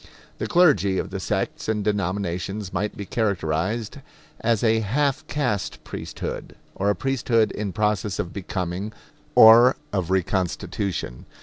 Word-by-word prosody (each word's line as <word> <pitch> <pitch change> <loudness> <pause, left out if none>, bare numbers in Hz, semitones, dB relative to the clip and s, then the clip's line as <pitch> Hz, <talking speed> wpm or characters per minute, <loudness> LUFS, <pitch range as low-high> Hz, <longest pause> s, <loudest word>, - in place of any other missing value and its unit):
The - - -2
clergy 145 - +4
of - - -3
the 95 - -4
sects 95 +2 -2
and 105 -2 0
denominations 100 -1 -2
might 105 +3 -2
be 100 - -5
characterized 100 - -1 0.4
as 115 -1 +1
a 110 -1 +4
half 135 +6 0
caste 105 - -2
priesthood, - - -6 0.2
or 100 +1 0
a 105 - +2
priesthood 120 -4 +1
in 105 -2 -3
process 105 0 0
of 85 - -3
becoming 95 +1 -4 0.4
or 115 +3 +8 0.2
of 95 -4 -1
reconstitution. 95 -5 -2
105 Hz, 130 wpm, -24 LUFS, 95-110 Hz, 0.4 s, or